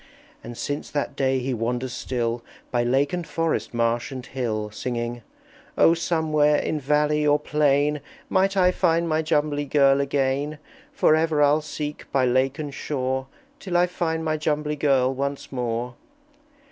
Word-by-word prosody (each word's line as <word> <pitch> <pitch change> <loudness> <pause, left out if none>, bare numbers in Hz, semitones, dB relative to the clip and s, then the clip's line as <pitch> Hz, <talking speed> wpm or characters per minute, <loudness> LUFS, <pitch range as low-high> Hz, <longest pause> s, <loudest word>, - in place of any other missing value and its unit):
And 120 0 -8
since 145 +1 -4
that 145 - -2
day 135 -1 +1
he 130 +1 -2
wanders 120 +2 -2
still 120 -2 -2 0.3
By 120 -1 +1
lake 135 +5 +1
and 175 -2 -3
forest, 165 -1 -1
marsh 120 +4 0
and 130 -2 -6
hill, 110 -6 -3
Singing, 120 +1 -4 0.6
"O 165 - +6
somewhere, 155 -3 +2
in 155 +1 -1
valley 150 +2 +2
or 145 0 +5
plain, 150 -1 +1 0.3
Might 195 +1 +1
I 180 -1 +5
find 170 -1 +1
my 155 0 +1
Jumbly 150 -2 0
Girl 140 -1 +4
again! 140 +2 -1 0.3
For 155 - +4
ever 160 -2 +2
I'll 145 +2 +4
seek 150 -1 -6
by 135 -2 +2
lake 130 +2 +1
and 150 -3 -5
shore 130 -2 -2 0.3
Till 180 -3 -1
I 175 - +5
find 165 -2 -2
my 155 0 0
Jumbly 150 0 -1
Girl 135 -3 +2
once 140 +1 -4
more!" 120 -1 -2
145 Hz, 160 wpm, -24 LUFS, 130-155 Hz, 0.6 s, O